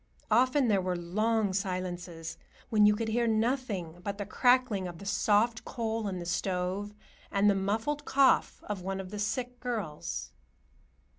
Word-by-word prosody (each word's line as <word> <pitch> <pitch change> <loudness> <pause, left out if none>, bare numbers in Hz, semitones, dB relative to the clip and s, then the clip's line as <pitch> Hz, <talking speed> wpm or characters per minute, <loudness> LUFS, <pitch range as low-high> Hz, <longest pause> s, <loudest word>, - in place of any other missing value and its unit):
Often 255 +2 +4
there 200 -4 +3
were 180 0 -1
long 210 +4 0
silences, 180 -4 -3 0.4
when 210 -2 +6
you 210 - +5
could 225 +1 -2
hear 235 +1 +1
nothing 220 -7 -1
but 200 0 -3
the 205 - -4
crackling 245 -3 +2
of 175 -1 -8
the 200 - -10
soft 210 +3 +2
coal 225 -2 -2
in 190 -2 -3
the 175 - -5
stove 185 +3 -2 0.4
and 200 +1 +3
the 205 - +6
muffled 220 +10 -1
cough 275 -2 +3
of 205 -3 -4
one 195 +1 -3
of 190 -1 -7
the 210 - -5
sick 245 +4 -2
girls. 195 - -4
205 Hz, 160 wpm, -30 LUFS, 185-230 Hz, 0.4 s, when